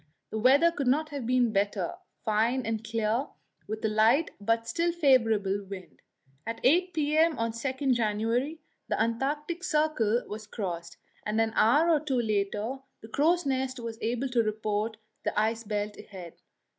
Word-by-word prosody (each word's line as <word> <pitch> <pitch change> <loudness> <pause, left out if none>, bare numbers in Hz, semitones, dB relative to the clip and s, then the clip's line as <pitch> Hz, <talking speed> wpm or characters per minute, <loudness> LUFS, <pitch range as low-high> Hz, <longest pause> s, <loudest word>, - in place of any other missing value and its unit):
The 220 - -2
weather 275 +8 +5
could 285 -6 -3
not 305 +5 +2
have 280 -6 -5
been 245 -3 +2
better 200 +1 0 0.3
fine 230 +4 +1
and 225 0 -2
clear, 225 +3 0 0.4
with 215 +1 -4
a - - +4
light 220 +9 +3
but 230 +2 0
still 335 +9 +1
favourable 225 - +2
wind. 190 -2 -9 0.4
At 230 0 -5
8 355 +8 +4
p.m. 310 +1 +2
on 230 0 0
January 240 +1 0
2 - - -24 0.3
the - - 0
Antarctic 290 +9 -1
Circle 300 - +1
was 210 0 -7
crossed, 170 -6 -5 0.3
and 215 +1 -1
an 225 0 +1
hour 295 +10 +4
or 310 - +4
two 275 -4 -1
later 215 +3 -1 0.2
the 220 - -10
crow's 330 +7 +2
nest 260 -1 -1
was 230 -1 -6
able 240 +4 -1
to 245 -2 +3
report 215 0 -2 0.3
the - - 0
ice 225 +2 0
belt 210 -1 -3
ahead. 180 -5 -10
230 Hz, 160 wpm, -28 LUFS, 215-280 Hz, 0.4 s, weather